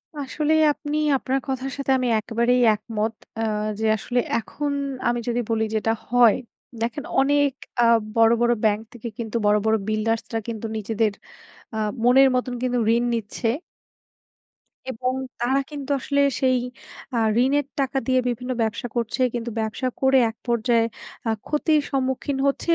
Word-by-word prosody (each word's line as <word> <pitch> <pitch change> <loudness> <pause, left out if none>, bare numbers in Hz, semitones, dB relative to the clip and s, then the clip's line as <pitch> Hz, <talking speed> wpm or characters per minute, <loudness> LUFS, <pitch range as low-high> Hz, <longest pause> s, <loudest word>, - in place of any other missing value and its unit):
আসলে 295 +2 -1 0.2
আপনি 295 -1 -4 0.2
আপনার 265 +1 -1
কথার 265 0 -3
সাথে 275 -1 -1
আমি 255 - -1
একেবারেই 235 +3 +1
একমত। 220 0 -3 0.2
অ্যা 225 - 0 0.3
যে 220 - -1
আসলে 245 +4 -1 0.2
এখন 290 +5 -4 0.4
আমি 240 0 +1
যদি 240 0 0
বলি 225 -1 +1
যেটা 220 +1 +1 0.2
হয়; 240 -2 +6 0.5
দেখেন 240 +5 -2 0.2
অনেক 285 +1 +3 0.3
আ - - +5 0.3
বড়, 225 0 +5
বড় 240 0 +4
ব্যাংক 215 0 +2
থেকে 240 0 -7
কিন্তু 235 0 -3
বড়, 205 0 +5
বড় 220 0 +4
বিল্ডার্সরা 225 +1 -1
কিন্তু 225 -1 -4
নিজেদের 215 0 0 0.6
আ - - -2 0.3
মনের 265 +2 +6
মতন 250 0 -1
কিন্তু 250 -1 +1 0.2
ঋণ 235 - +1
নিচ্ছে। 225 +1 -2 1.4
এবং 255 +2 -2 0.3
তারা 255 +3 +2
কিন্তু 285 -2 -7
আসলে 280 +2 +1 0.2
সেই 255 -1 +3 0.6
আ - - +1 0.3
ঋণের 285 +2 +2
টাকা 270 0 0
দিয়ে 255 -1 +3
বিভিন্ন 250 +1 -2
ব্যবসা 220 +2 -1
করছে। 235 +1 -1
কিন্তু 235 0 -3
ব্যবসা 225 +4 -2
করে 265 0 +5
এক 225 - -9
পর্যায়ে 235 0 +2 0.4
আ - - +2 0.2
ক্ষতির 300 0 +2
সম্মুখীন 265 +1 -1
হচ্ছে 275 - -1
245 Hz, 150 wpm, -23 LUFS, 225-270 Hz, 1.4 s, হয়